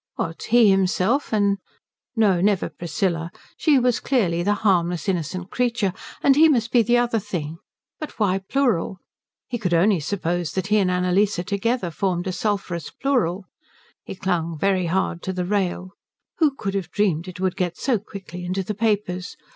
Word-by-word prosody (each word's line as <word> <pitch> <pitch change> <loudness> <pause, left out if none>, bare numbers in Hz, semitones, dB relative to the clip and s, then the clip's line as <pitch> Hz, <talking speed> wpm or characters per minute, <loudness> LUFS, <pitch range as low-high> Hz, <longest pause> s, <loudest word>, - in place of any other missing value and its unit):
What, 165 0 -4
himself 210 +2 +3
and 200 -2 +2 0.6
no, 200 -6 +3
never 200 -1 +2
Priscilla. 170 0 -2 0.2
She 300 -3 +3
was 250 -2 +2
clearly 185 -11 +1
the 205 +4 +1
harmless 175 -2 +2
innocent 180 0 -2
creature, 235 -6 0 0.3
and 275 - +5
he 320 +2 +6
must 235 -5 +1
be 245 - +5
the 240 +2 +3
other 240 -2 +1
thing. 165 -6 -5 0.4
But 305 - -7
why 195 -3 +1
plural? 195 -4 0 0.5
He 240 -2 -4
could 180 -5 +1
only 185 +2 +4
suppose 175 -1 -2
that 190 -1 -1
he 215 - +5
and 190 -2 +2
Annalise 180 +3 +2
together 200 +2 -1
formed 180 0 -1
a 190 - -1
sulphurous 185 -5 -2
plural. 215 -9 0 0.6
He - - -7
clung 170 -4 -1
very 185 +1 +1
hard 175 0 -1
to 190 - -3
the 180 -1 -2
rail. 185 -2 -1 0.5
Who 300 -5 +3
could 195 -7 -3
have 190 -4 -3
dreamed 185 -5 0
it 185 +1 -8
would 185 -1 0
get 175 -2 -2
so 250 -5 +1
quickly 190 -4 -9
into 185 +2 -2
the 210 - -3
papers? 200 -4 -1
190 Hz, 170 wpm, -23 LUFS, 175-215 Hz, 0.6 s, he